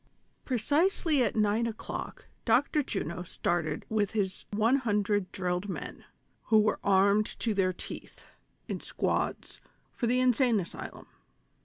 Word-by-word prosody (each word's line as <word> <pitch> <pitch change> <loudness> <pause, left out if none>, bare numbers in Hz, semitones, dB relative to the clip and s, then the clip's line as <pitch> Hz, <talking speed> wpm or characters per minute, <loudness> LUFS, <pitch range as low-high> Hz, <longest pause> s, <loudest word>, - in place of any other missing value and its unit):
ilRECISELY 290 - +2
at 225 -5 +1
nine 215 +2 +2
o'clock 220 -1 -6 0.2
Dr. 265 +6 +3
Juno 180 - -3
started 170 -3 -2
with 210 -2 0
his 190 -4 -2
one 220 +6 +3
hundred 205 -5 0
drilled 180 +1 -2
men, 185 - -6 0.4
who 220 - +4
were 215 0 +2
armed 200 +2 +4
to 225 - 0
their 190 -2 +2
teeth, 180 - -9 0.4
in - - -3
squads, - - -2 0.3
for 235 - -1
the 250 +2 +2
Insane 250 -2 +3
Asylum. 170 - -7
210 Hz, 130 wpm, -30 LUFS, 190-240 Hz, 0.4 s, who